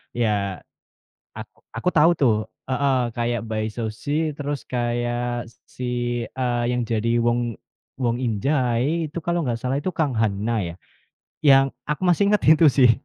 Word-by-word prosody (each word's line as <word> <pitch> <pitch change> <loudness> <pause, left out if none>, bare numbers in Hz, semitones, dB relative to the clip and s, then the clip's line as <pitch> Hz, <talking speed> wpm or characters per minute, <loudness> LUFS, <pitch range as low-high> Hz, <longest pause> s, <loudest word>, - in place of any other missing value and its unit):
Ya, 105 -5 0 0.7
ak - - -8 0.3
aku 180 - 0
tahu 160 +2 +6
tuh, 125 -6 +4 0.4
heeh, 130 -1 +2 0.2
kayak 120 -1 0
Bae 110 0 -1
Suzy, 145 +8 -2
terus 145 -1 -4
kayak 120 -1 -2 0.2
si, 125 - -7 0.4
eee, 125 -2 -1
yang 125 -1 0
jadi 115 +1 0
Wong 120 -2 0 0.4
Won 120 -2 +1
In-jae 130 +6 0
itu 170 - -4
kalau 170 0 -1
nggak 120 -3 -2
salah 130 +2 -1
itu 185 - -2
Kang 155 -5 0
Han-na, 110 +1 0 0.2
ya. - - -12 0.7
Yang 135 -1 +7 0.2
aku 150 +4 -3
masih 180 +2 +3
ingat 210 - +2
itu 160 +1 +7
sih. 130 -3 +6
125 Hz, 145 wpm, -23 LUFS, 115-145 Hz, 0.7 s, Yang